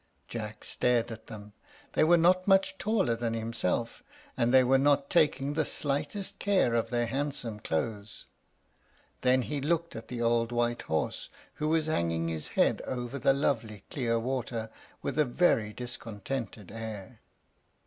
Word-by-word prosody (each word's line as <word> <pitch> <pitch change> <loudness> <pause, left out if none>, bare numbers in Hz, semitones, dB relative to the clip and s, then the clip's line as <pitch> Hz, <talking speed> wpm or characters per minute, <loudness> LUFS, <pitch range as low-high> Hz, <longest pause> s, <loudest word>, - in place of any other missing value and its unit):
Jack 105 -2 -6
stared 120 -1 +1
at 110 0 -9
them. 105 -2 -10 0.4
They - - +4
were 170 +2 +6
not 185 +3 +4
much 195 0 +3
taller 195 - +1
than 115 -1 -2
himself, 115 0 -2 0.3
and 120 0 +2
they 130 0 +7
were 135 +2 +4
not 140 0 +3
taking 145 -4 +3
the 155 +1 +1
slightest 145 +8 -2
care 195 -12 +2
of 115 -1 +1
their 120 0 +1
handsome 125 -3 -3
clothes; 105 +4 -3 1.0
then 130 0 +4
he 145 +2 -3
looked 170 +3 0
at 115 0 -7
the 120 -1 -5
old 115 0 +2
white 120 0 0
horse, 80 -1 -2 0.3
who 150 - +1
was 160 0 +2
hanging 85 - 0
his 80 -2 -3
head - - +3
over 125 +1 -3
the 135 - +4
lovely 115 -7 -1
clear 115 -4 0
water 115 -2 -3 0.3
with - - -2
a - - +7
very 120 -6 +2
discontented 115 -2 -6
air. 110 -3 -7
120 Hz, 155 wpm, -30 LUFS, 110-145 Hz, 1.0 s, they